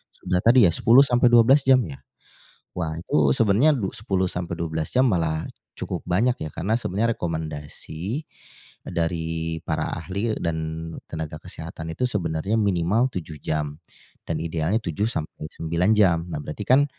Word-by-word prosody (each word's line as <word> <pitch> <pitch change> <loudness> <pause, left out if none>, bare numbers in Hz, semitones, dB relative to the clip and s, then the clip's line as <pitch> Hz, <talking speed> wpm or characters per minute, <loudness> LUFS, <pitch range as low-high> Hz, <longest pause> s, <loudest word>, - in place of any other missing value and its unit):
sudah 90 0 -1
tadi 120 +1 +6
ya, - - +2
10-12 120 - +5
jam, 130 -1 +6
ya? 70 -3 -9 0.8
Wah, 80 -3 -2
itu 75 -5 +2
sebenarnya 115 - +4
du 100 -5 -1
10-12 85 -6 -2
jam, 130 +1 +4
malah 80 -5 0 0.3
cukup - - -5
banyak, 115 +8 +2
ya, 80 - -4
karena 110 +6 0
sebenarnya 115 +1 0
rekomendasi, 80 - -4 0.6
eee, - - -6
dari 80 -1 -2
para 80 0 -1
ahli 100 +6 -2
dan 85 -1 -2 0.5
tenaga 80 -1 -5
kesehatan 80 -2 -7
itu 125 - +1
sebenarnya, 85 -1 -1
minimal 100 +5 +2
7 80 -4 -6
jam, 75 -1 -2 0.5
dan 80 - -1
idealnya 85 +4 0
7-9 85 -1 -2
jam. 90 -5 +3
Nah, 80 - -3
berarti 75 - -7
kan, 135 +3 +5
85 Hz, 135 wpm, -24 LUFS, 80-110 Hz, 0.8 s, tadi